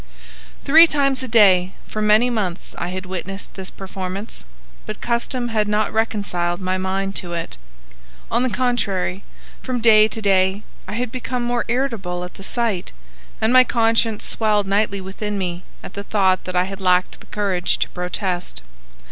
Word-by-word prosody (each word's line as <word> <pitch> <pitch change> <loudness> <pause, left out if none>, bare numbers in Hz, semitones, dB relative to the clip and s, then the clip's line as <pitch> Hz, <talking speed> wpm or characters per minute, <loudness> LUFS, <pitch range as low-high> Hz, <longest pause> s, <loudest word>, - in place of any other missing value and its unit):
Three 320 +4 +8
times 275 -4 +1
a 260 - -4
day 190 -5 +5
for 215 - -4
many 215 +4 +4
months 190 -7 -3
I 175 - -2
had 185 +1 -5
witnessed 190 +2 -6
this 190 -1 -7
performance, 190 - -6 0.4
but 215 - -5
custom 240 +1 -1
had 215 -2 +1
not 210 +1 0
reconciled 200 -6 -1
my 185 0 -1
mind 195 +1 -2
to 175 -1 -4
it. 165 - -4 0.8
On - - +2
the 255 - +1
contrary, 200 -7 -1 0.4
from 255 -2 -2
day 215 -2 +6
to 225 - -7
day 195 0 +2 0.2
I - - -5
had 240 +1 -2
become 250 0 -3
more 240 0 0
irritable 230 -9 -1
at 180 - -8
the 195 - -12
sight, 220 - -1 0.5
and 220 +3 +2
my 255 0 +8
conscience 225 -2 +1
swelled 210 -2 +1
nightly 200 0 0
within 205 +2 -4
me 180 -2 -3 0.2
at - - -9
the 200 - -5
thought 190 -3 +1
that 185 - -5
I 180 - +4
had 195 +1 -7
lacked 180 -1 +2
the - - -17
courage 190 -4 -1
to - - -1
protest. 180 - -3
200 Hz, 170 wpm, -21 LUFS, 185-230 Hz, 0.8 s, Three